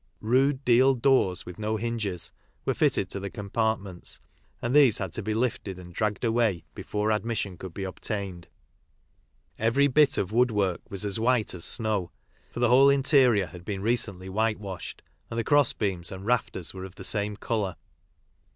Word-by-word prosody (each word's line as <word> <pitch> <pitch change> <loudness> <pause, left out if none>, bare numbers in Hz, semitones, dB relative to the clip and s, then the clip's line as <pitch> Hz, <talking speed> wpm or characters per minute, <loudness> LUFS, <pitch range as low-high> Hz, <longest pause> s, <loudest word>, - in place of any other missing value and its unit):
Eude 130 +4 +1
deal 130 +2 +5
doors, 125 -8 +2
with 90 +2 -9
no 110 +1 -1
hinges, 105 -7 -3 0.3
were - - +1
fitted - - +1
to - - -5
the 100 0 -5
compart 110 +1 -1
ments, 95 -3 -9 0.4
and 120 +3 -1
these 135 -7 +6
had 95 -8 -4
to - - -2
be 110 +1 -2
lifted 115 -5 -2
and 90 -1 -11
dragged 105 +3 -1
away 115 -7 +1
before 105 +1 -2
admission 110 -3 -1
could 95 +1 -8
be 95 - -6
obtained. 95 -2 -5 1.1
Every 115 +6 +3
bit 145 +1 +4
of 95 - -1
wookwork 105 -6 +2
was 100 +1 -3
as 100 +2 +1
white 115 -2 +1
as 90 -2 -5
snow, 105 -6 0 0.4
for - - -7
the 120 -1 +3
whole 135 +3 +7
interior 135 -7 +4
had 85 +2 -11
been 100 0 -4
recently 105 -5 0
whitewashed, 105 -3 -3 0.3
and 115 - -5
the 115 - +1
cross 145 -1 +4
beams 95 -5 -3
and 95 0 -8
rafters 110 -7 -1
were 95 0 -7
of 95 0 -9
the - - -9
same 105 +1 +1
colour. 105 -6 -2
105 Hz, 175 wpm, -27 LUFS, 95-120 Hz, 1.1 s, whole